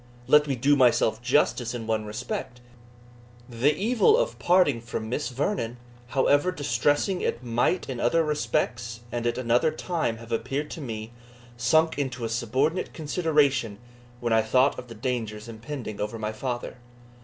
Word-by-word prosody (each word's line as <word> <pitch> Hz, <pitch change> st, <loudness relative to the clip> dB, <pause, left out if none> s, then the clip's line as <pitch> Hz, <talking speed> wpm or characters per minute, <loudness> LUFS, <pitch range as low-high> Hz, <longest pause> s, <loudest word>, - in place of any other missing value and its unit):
Let 150 Hz, +3 st, +5 dB
me 135 Hz, -, 0 dB
do 140 Hz, +4 st, +3 dB
myself 120 Hz, -4 st, +3 dB
justice 125 Hz, -1 st, +1 dB
in 115 Hz, -2 st, -5 dB
one 110 Hz, -1 st, -1 dB
respect. 105 Hz, +3 st, -5 dB, 0.9 s
The 130 Hz, +5 st, +1 dB
evil 250 Hz, -, +4 dB
of -, -, -1 dB
parting 175 Hz, -9 st, +3 dB
from 110 Hz, -1 st, -5 dB
Miss 140 Hz, +5 st, -2 dB
Vernon, 125 Hz, -, -2 dB, 0.3 s
however 145 Hz, +6 st, +2 dB
distressing 145 Hz, -, 0 dB
it 125 Hz, -, -2 dB
might 120 Hz, +9 st, 0 dB
in 130 Hz, -3 st, -4 dB
other 165 Hz, +9 st, +3 dB
respects 125 Hz, -6 st, -1 dB
and 120 Hz, 0 st, -2 dB
at 120 Hz, -, -1 dB
another 125 Hz, +4 st, +2 dB
time 155 Hz, -6 st, -2 dB
have 115 Hz, 0 st, -12 dB
appeared 140 Hz, +6 st, -2 dB
to 165 Hz, -, -6 dB
me, 110 Hz, -4 st, -6 dB, 0.4 s
sunk 145 Hz, +5 st, +2 dB
into 130 Hz, -4 st, -2 dB
a -, -, -2 dB
subordinate 130 Hz, +9 st, 0 dB
consideration 150 Hz, -, +1 dB, 0.4 s
when 120 Hz, -2 st, 0 dB
I 110 Hz, -, +5 dB
thought 130 Hz, +5 st, +2 dB
of 125 Hz, -, -9 dB
the 115 Hz, -, -10 dB
dangers 110 Hz, -2 st, -3 dB
impending 115 Hz, -1 st, -6 dB
over 105 Hz, +2 st, -3 dB
my 110 Hz, -1 st, -3 dB
father. 120 Hz, +3 st, -4 dB
125 Hz, 155 wpm, -26 LUFS, 115-150 Hz, 0.9 s, Let